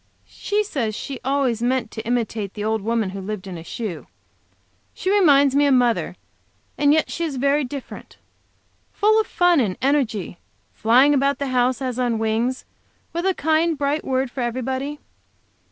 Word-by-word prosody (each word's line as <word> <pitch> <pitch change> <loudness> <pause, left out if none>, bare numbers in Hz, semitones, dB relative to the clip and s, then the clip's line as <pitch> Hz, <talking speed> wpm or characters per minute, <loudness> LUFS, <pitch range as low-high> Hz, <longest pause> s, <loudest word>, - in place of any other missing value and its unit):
She 420 +1 -2
says 240 - -3
she 270 +3 -6
ways 265 -4 0
meant 245 -2 0
to 220 - -6
imitate 225 -4 -2
the 210 - -4
old 220 0 0
woman 225 -2 -1
who 195 0 -6
lived 200 0 -5
in 190 -2 -7
a 165 - -8
shoe. 195 -2 -6 0.9
She 380 - -1
reminds 285 -9 +5
me 285 +1 +4
of 275 - +4
mother, 245 -2 +1 0.6
and 290 0 +3
yet 315 +1 +2
she 335 - -3
is 310 -4 -2
very 280 +3 +2
different; 270 +1 -8 0.7
full 435 +1 +3
of - - -7
fun 355 -3 +3
and 205 -7 0
energy; 245 -10 0 0.3
flying 255 +6 +4
about 280 0 +2
the 280 -1 -3
house 255 0 +1
as 255 -1 -3
on 240 -2 +1
wings, 225 +4 -1 0.5
with 340 +3 -1
a 380 - +1
kind, 320 +1 +1
bright 285 +2 -1
word 260 -1 -1
for 260 - -5
everybody. 260 +4 -3
260 Hz, 170 wpm, -22 LUFS, 230-290 Hz, 0.9 s, reminds